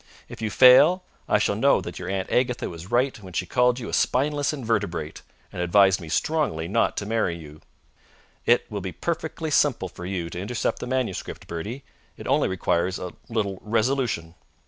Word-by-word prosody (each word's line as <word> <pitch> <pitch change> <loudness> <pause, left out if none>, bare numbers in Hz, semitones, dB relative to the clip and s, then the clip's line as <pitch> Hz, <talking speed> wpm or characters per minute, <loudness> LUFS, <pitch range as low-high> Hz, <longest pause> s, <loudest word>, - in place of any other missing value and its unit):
If - - -10
you 110 - -1
fail, 145 - +7 0.3
I - - +5
shall - - +1
know - - +4
that - - -7
your 90 0 -5
Aunt 95 -1 -3
Agatha 125 -1 +1
was 85 +2 -9
right 130 +2 +2
when 95 -2 -11
she 90 - -1
called 125 +5 +2
you 115 - -6
a - - -7
spineless 145 +3 +1
invertebrate 105 - -2 0.3
and 90 - -4
advised 95 +2 +4
me 80 - -8
strongly 90 - 0
not 115 +6 +1
to 105 - -2
marry 105 -6 0
you. 75 -2 -12 0.9
It 120 +1 +4
will 100 -1 -3
be 95 -1 -5
perfectly 160 -1 -3
simple 130 -10 +2
for 90 +1 -8
you 90 -3 -3
to 90 - -5
intercept 105 +3 -2
the - - -5
manuscript, 130 -7 -3
Bertie. 105 +11 -5 0.3
It - - -9
only - - +2
requires 90 0 0
a 90 - -6 0.2
little 100 -4 -2
resolution." 110 -6 0
105 Hz, 185 wpm, -25 LUFS, 90-125 Hz, 0.9 s, fail